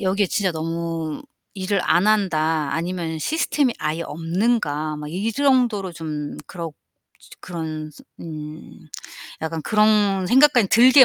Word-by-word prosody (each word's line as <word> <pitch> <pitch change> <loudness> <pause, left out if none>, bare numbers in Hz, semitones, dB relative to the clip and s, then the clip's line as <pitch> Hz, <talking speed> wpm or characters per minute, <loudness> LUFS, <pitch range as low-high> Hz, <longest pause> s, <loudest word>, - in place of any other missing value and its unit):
여기에 195 +1 +1
'진짜 190 0 0
너무 165 -1 -3 0.3
일을 190 0 0
안 180 +4 +3
한다. 160 -8 +2
아니면 165 0 -2
시스템이 285 - +1
아예 155 +2 -2
없는가?' 165 -3 -1
막 150 0 -6
이 195 +8 -2
정도로 245 -8 +2
좀 150 -3 -5
그렇 170 -3 -6 0.5
진짜 - - -16
그런 155 -3 -5
스 - - -16 0.2
음 155 -1 -9 0.5
약간 160 0 -3
그런 210 -1 +3
생각까지 245 -3 +5
들게 255 +4 +8
175 Hz, 260 characters per minute, -22 LUFS, 160-215 Hz, 0.5 s, 들게